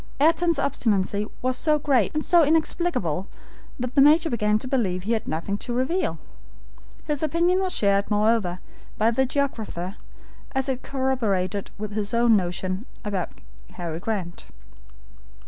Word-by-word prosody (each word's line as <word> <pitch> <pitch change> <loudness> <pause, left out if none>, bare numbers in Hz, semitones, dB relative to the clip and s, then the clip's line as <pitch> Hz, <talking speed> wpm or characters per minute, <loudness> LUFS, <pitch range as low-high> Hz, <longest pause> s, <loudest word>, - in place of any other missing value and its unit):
Ayrton's 330 +2 +3
obstinacy 210 -7 0 0.2
was 255 0 +1
so 305 +3 +2
great, 275 -7 +2
and 305 - -1
so 345 -1 +5
inexplicable, 305 - +1 0.5
that 250 0 -3
the 275 - +5
Major 310 +3 +5
began 210 -2 +2
to 240 - -5
believe 195 -9 0
he 215 - -2
had 225 -3 -1
nothing 185 +6 -2
to 245 - -5
reveal. 260 +10 0 0.9
His 295 -2 -2
opinion 340 +4 +2
was 375 -1 0
shared, 200 -1 +2
moreover, 210 -4 +1 0.4
by 220 +2 +3
the 265 +3 +1
geographer, 220 -9 -3 0.6
as 265 0 0
it 260 -1 -2
corroborated 220 -9 -1
his 210 +1 -3
own 235 -1 +5
notion 185 +3 -2 0.2
about 195 -4 -2 0.4
Harry 165 -2 -5
Grant. 185 -4 -4
230 Hz, 140 wpm, -24 LUFS, 200-280 Hz, 0.9 s, so